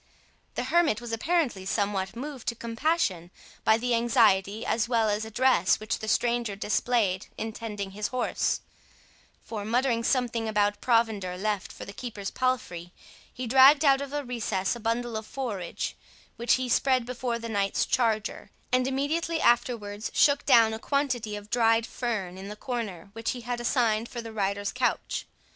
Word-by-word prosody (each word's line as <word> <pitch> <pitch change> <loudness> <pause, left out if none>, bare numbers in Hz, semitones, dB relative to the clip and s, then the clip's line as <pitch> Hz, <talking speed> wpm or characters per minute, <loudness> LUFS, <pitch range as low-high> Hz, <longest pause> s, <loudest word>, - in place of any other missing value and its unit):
The - - -1
hermit 335 -11 +2
was 240 -1 -7
apparently 250 - 0
somewhat 200 0 -1
moved 270 0 -7
to 235 - 0
compassion 230 - -1 0.3
by 220 - +5
the 245 +1 -1
anxiety 220 -3 +3
as 230 +1 0
well 230 -3 +2
as 210 +1 -1
address 220 -4 +3
which 215 - -3
the 220 - -6
stranger 235 -2 +1
displayed 210 -2 0
in 220 0 -4
tending 205 -4 -5
his 210 +2 -3
horse; 255 -1 -1 0.8
for, 215 -3 -5
muttering 235 +1 +1
something 235 -3 0
about 205 -1 +1
provender 220 -7 +1
left 205 0 -2
for - - -9
the 200 - -9
keeper's 210 -4 -6
palfrey, 215 -10 -2 0.4
he 255 - -5
dragged 270 +5 +7
out 275 -1 +5
of 280 -1 -5
a 290 0 -2
recess 220 -6 -1
a - - -8
bundle 230 +1 -1
of 220 0 -4
forage, 215 -10 -4 0.4
which 235 +1 +2
he 255 -1 0
spread 255 0 +2
before 245 -1 -2
the 230 0 -6
knight's 200 -3 0
charger, 225 -3 0 0.2
and 255 0 +2
immediately 315 +5 -1
afterwards 230 -5 +1
shook 285 -1 +4
down 225 -2 +6
a 220 - -4
quantity 250 -6 -1
of 205 0 -9
dried 230 -1 +3
fern 200 -9 -3
in 195 - -7
the 210 - -7
corner 210 -7 -5
which 225 +2 -2
he 245 - -7
had 240 +1 -3
assigned 235 -2 +1
for 240 - -6
the 225 -1 -7
rider's 200 -1 -1
couch. 250 -1 -1
230 Hz, 165 wpm, -27 LUFS, 210-250 Hz, 0.8 s, dragged